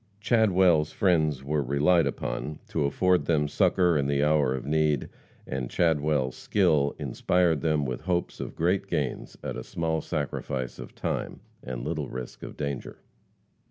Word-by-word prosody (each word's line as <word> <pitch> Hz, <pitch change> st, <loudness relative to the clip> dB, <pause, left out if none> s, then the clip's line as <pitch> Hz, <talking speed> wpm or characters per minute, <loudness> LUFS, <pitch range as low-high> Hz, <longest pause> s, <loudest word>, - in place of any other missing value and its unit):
Chadwell's 95 Hz, -8 st, +3 dB
friends 80 Hz, -7 st, +2 dB
were 75 Hz, +2 st, 0 dB
relied 70 Hz, +5 st, +3 dB
upon 75 Hz, +2 st, -4 dB
to 75 Hz, -3 st, 0 dB
afford 90 Hz, +5 st, +2 dB
them 75 Hz, -3 st, +2 dB
succor 90 Hz, +3 st, +3 dB
in 70 Hz, -, 0 dB
the 70 Hz, 0 st, +1 dB
hour 75 Hz, -3 st, +3 dB
of 65 Hz, -, -6 dB
need, 75 Hz, -2 st, +1 dB, 0.4 s
and 65 Hz, -2 st, -4 dB
Chadwell's 75 Hz, -5 st, +1 dB
skill 75 Hz, -8 st, +2 dB
inspired 80 Hz, +3 st, +1 dB
them 75 Hz, -3 st, +1 dB
with 65 Hz, -2 st, -3 dB
hopes 90 Hz, +1 st, -2 dB
of -, -, -6 dB
great 90 Hz, +4 st, +1 dB
gains, -, -, -3 dB
at -, -, -4 dB
a -, -, -5 dB
small 80 Hz, -1 st, -2 dB
sacrifice 65 Hz, -4 st, -3 dB
of -, -, -9 dB
time -, -, -3 dB, 0.2 s
and 60 Hz, -1 st, -5 dB
little 75 Hz, -3 st, -3 dB
risk 65 Hz, -1 st, -7 dB
of -, -, -8 dB
danger. 70 Hz, -3 st, -4 dB
75 Hz, 155 wpm, -27 LUFS, 70-85 Hz, 0.4 s, Chadwell's